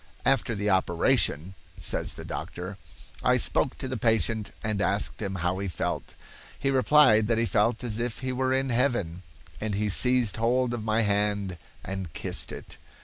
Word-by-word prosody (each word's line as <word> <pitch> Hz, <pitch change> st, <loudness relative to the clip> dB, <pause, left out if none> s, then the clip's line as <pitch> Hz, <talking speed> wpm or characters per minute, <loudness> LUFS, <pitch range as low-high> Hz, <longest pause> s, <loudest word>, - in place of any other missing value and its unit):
"After 130 Hz, -3 st, +2 dB
the 100 Hz, +1 st, -2 dB
operation," 85 Hz, -2 st, +2 dB, 0.3 s
says -, -, -1 dB
the -, -, -9 dB
doctor, 90 Hz, +3 st, -6 dB, 0.4 s
"I -, -, +3 dB
spoke -, -, +2 dB
to -, -, -5 dB
the 130 Hz, -1 st, -3 dB
patient 110 Hz, -1 st, +1 dB
and 105 Hz, -2 st, -1 dB
asked 100 Hz, +2 st, 0 dB
him 100 Hz, -2 st, -3 dB
how 90 Hz, +1 st, -1 dB
he 100 Hz, -, -3 dB
felt. 90 Hz, -, -4 dB, 0.4 s
He 135 Hz, -, 0 dB
replied 130 Hz, -5 st, +5 dB
that 115 Hz, 0 st, +1 dB
he 115 Hz, -, +2 dB
felt 115 Hz, +2 st, +1 dB
as 115 Hz, -2 st, -2 dB
if 120 Hz, -1 st, -2 dB
he 130 Hz, -1 st, -2 dB
were 130 Hz, +1 st, 0 dB
in 135 Hz, 0 st, +1 dB
heaven, 115 Hz, -9 st, 0 dB, 0.4 s
and 105 Hz, -2 st, -2 dB
he 105 Hz, +1 st, 0 dB
seized 125 Hz, +1 st, +3 dB
hold 120 Hz, +2 st, +1 dB
of 115 Hz, -3 st, -4 dB
my 110 Hz, +1 st, +1 dB
hand 100 Hz, -3 st, -1 dB, 0.2 s
and 95 Hz, -4 st, -6 dB
kissed -, -, -3 dB
it. -, -, -10 dB
110 Hz, 175 wpm, -27 LUFS, 100-125 Hz, 0.4 s, replied